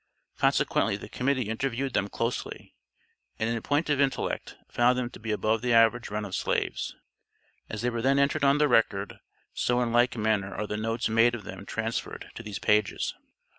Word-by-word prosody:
Consequently - - +2
the - - -9
Committee 130 -3 0
interviewed 130 +3 -2
them 100 - +1
closely, 115 +3 -4 0.6
and 110 - -1
in 115 -1 -2
point 145 +6 0
of 145 -2 +2
intellect 135 -1 -1
found 125 +1 +3
them 125 -1 -2
to - - -11
be 110 - -7
above 110 +1 +1
the 125 -1 +1
average 115 +1 +4
run 105 0 -3
of 95 - -8
slaves. - - -1 0.7
As 110 +1 -5
they 125 - +1
were 115 -1 -2
then 135 +3 +3
entered 140 +2 +2
on 140 +1 +5
the 150 0 +4
record, 105 -5 +1 0.3
so 120 0 +1
in 120 -2 0
like 120 0 +3
manner 105 -3 0
are 105 - -2
the 105 - -4
notes 115 +2 -1
made 115 +2 +4
of 110 - -8
them - - -9
transferred - - -4
to - - -8
these 105 -3 -6
pages. 105 -2 +1
115 Hz, 190 wpm, -28 LUFS, 110-125 Hz, 0.7 s, on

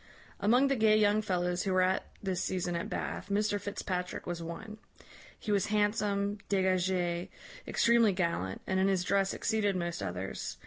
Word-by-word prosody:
"Among 245 +6 +4
the 275 - +2
gay 215 -2 +4
young 210 0 +3
fellows 180 -3 -1
who 190 0 -1
were 185 0 +4
at 185 +1 0 0.2
this 190 -2 -1
season 180 -1 -2
at 170 - -3
Bath, - - -4
Mr 205 0 +1
Fitzpatrick 185 -3 -4
was 175 -1 -4
one. 190 +6 -7 0.6
He 215 - -3
was 200 -2 +2
handsome, 205 -1 0
dégagé, 185 -2 +1 0.4
extremely 235 -2 +4
gallant, 170 - -2
and 190 0 0
in 190 - +3
his 190 -2 +2
dress 195 +1 +2
exceeded 210 -3 0
most 170 -1 -3
others. 90 +2 -4
190 Hz, 165 wpm, -31 LUFS, 180-210 Hz, 0.6 s, Among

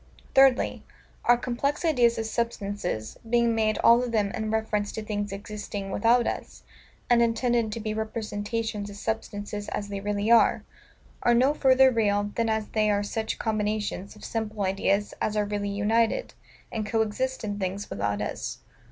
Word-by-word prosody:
Thirdly, 270 -1 +4 0.4
Our 240 - +6
complex 265 +6 -2
ideas 245 -7 +3
of 225 - -2
SUBSTANCES, 205 - -3
being 235 -1 +3
made 215 -1 +1
all 235 +1 +7
of 250 -1 -3
them 210 -3 +1
in 220 +1 -3
reference 215 -2 -1
to 220 - -4
things 205 -1 -3
existing 200 -1 -6
without 235 +4 +3
us, - - -5 0.4
and 240 -1 +4
intended 235 -1 +1
to 230 - -4
be 215 -1 -3
representations 215 -1 -3
of 200 - -9
substances 205 -1 -4
as 205 - -4
they 200 -1 -4
really 205 +2 -1
are, 235 - +5 0.6
are 240 - +4
no 260 +4 +4
further 265 -2 +5
real 205 -3 +1
than 230 -1 0
as 220 -1 -1
they 215 -1 +1
are 205 0 +2
such 220 +2 -3
combinations 210 -2 -2
of 210 - -11
simple 215 -2 -3
ideas 195 +1 0
as 215 0 0
are 210 - +2
really 205 0 -2
united, 220 - +1 0.4
and 215 -2 -3
co 225 +1 +2
exist 260 +5 -3
in 205 -1 -3
things 195 +1 -3
without 100 +1 -1
us. - - -4
215 Hz, 170 wpm, -26 LUFS, 205-230 Hz, 0.6 s, all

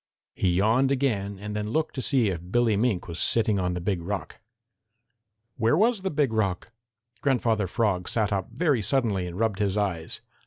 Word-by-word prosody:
He 90 -2 +1
yawned 110 +8 +3
again 105 -8 0
and 105 +2 -6
then 105 0 -2
looked 160 +7 -1
to 130 - -4
see 125 -6 +2
if 85 -3 -3
Billy 120 0 +2
Mink 105 -3 0
was 85 0 -6
sitting 110 -3 +2
on 90 -1 -1
the - - -2
Big 90 0 -1
Rock. 85 -3 -5 1.2
Where 115 +4 +3
was 220 +1 +2
the 190 - -1
Big 145 -7 0
Rock? 100 -1 -1 0.5
Grandfather 115 -7 +1
Frog 95 -3 0
sat 105 -2 0
up 95 -2 -2
very 140 -2 +1
suddenly 105 -5 0
and 90 0 -7
rubbed 110 -2 0
his 100 -1 0
eyes. 90 -6 -2
105 Hz, 185 wpm, -26 LUFS, 95-125 Hz, 1.2 s, yawned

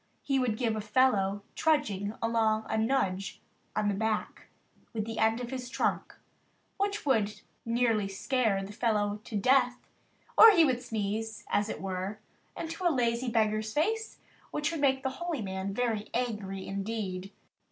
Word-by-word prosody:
He 275 -1 +1
would 240 -4 0
give 230 -3 0
a 215 - -2
fellow 205 -3 +2
trudging 215 -10 +1
along 220 -1 +2
a - - -1
nudge 220 -5 0 0.4
on 210 - +1
the 205 - +2
back 220 +2 -2 0.5
with 215 -2 -2
the 225 0 -5
end 225 +1 +3
of 245 0 -5
his 255 -2 -5
trunk, - - -1 0.6
which 405 0 -1
would 215 -6 +1 0.2
nearly 230 -3 +2
scare 200 0 0
the 200 +2 -8
fellow 210 -2 0
to 220 - -7
death; 250 +3 +3 0.6
or 450 - +11
he 335 -4 +6
would 250 -4 +1
sneeze, 220 -1 -3
as 205 +1 +1
it - - -4
were, 190 +2 -3 0.4
into 330 +3 -5
a 350 - +5
lazy 245 -3 +1
beggar's 215 -1 +1
face, 440 +9 0 0.3
which 300 +1 -1
would 325 -3 -3
make 265 -2 +3
the 265 - +1
"Holy 335 -9 -2
Man" 190 0 -3
very 220 -1 -1
angry 210 -6 -2
indeed. 195 -2 -4
225 Hz, 160 wpm, -30 LUFS, 205-255 Hz, 0.6 s, or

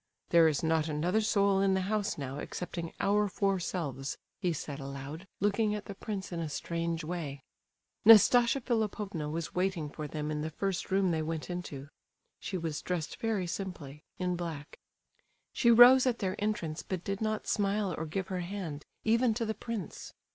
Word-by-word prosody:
"There 170 -1 +6
is 155 -1 0
not 160 -1 +2
another 170 +8 +1
soul 200 -2 +3
in 195 -1 +3
the 190 - +1
house 205 +2 -1
now 140 -1 -5
excepting 170 0 -5
our 205 +1 +3
four 195 0 0
selves," 140 -7 -3 0.2
he 180 -3 +1
said 145 -2 -5
aloud, 140 +6 -7
looking 210 +2 +2
at 210 - -6
the 200 - -6
prince 200 -1 -5
in 170 - -3
a 160 -2 -3
strange 165 +2 -2
way. 155 -5 -5 0.6
Nastasia 235 +4 +7
Philipovna 210 - -1
was 160 +1 -4
waiting 180 -5 -1
for 150 -1 -5
them 150 0 -3
in 150 0 -2
the 155 - -2
first 195 +3 -2
room 190 -1 +2
they 160 -1 0
went 160 +2 -3
into. 150 -6 -6 0.5
She 190 - -4
was 160 -3 -3
dressed 175 -4 -3
very 220 -5 -1
simply, 170 -6 -6
in 180 -1 -1
black. 165 -4 -6 0.7
She 235 - +3
rose 245 +3 +9
at 240 -2 +1
their 190 -2 -2
entrance, 165 -7 -2
but 185 -2 -4
did 195 +1 -3
not 215 -1 -1
smile 200 -2 0
or 160 - -4
give 190 +4 -3
her 185 -1 -2
hand, 175 -5 -5 0.2
even 230 +1 +3
to 230 0 -1
the 220 - -1
prince. 220 -5 -6
180 Hz, 180 wpm, -31 LUFS, 155-205 Hz, 0.7 s, rose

